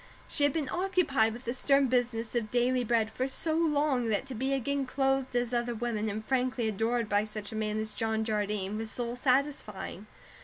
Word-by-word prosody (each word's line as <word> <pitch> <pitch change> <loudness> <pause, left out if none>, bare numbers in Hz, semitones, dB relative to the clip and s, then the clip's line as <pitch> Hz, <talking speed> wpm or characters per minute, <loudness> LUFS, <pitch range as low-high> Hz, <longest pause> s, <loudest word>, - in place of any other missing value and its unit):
She 290 - +1
had 285 - +3
been 300 -2 -2
occupied 350 - +2
with 240 +3 -10
the 235 - -1
stern 275 +1 +3
business 240 -3 0
of 235 -3 -1
daily 245 +2 +2
bread 225 -2 +1
for 255 +4 -1
so 315 +4 -1
long 295 -6 +2
that 215 +4 +1
to 270 - -6
be 265 +4 -1
again 275 +1 0
clothed 270 -1 0
as 245 0 0
other 240 0 0
women 220 -2 -1
and 215 +1 -4
frankly 255 -2 0
adored 225 +2 0
by 205 0 +2
such 215 -1 -6
a - - -6
man 215 0 -1
as 215 0 -3
John 220 -1 0
Jardine 210 -1 -1
was 225 0 -2
soul 240 +1 -3
satisfying. 250 -7 -1
240 Hz, 200 wpm, -30 LUFS, 220-270 Hz, -, had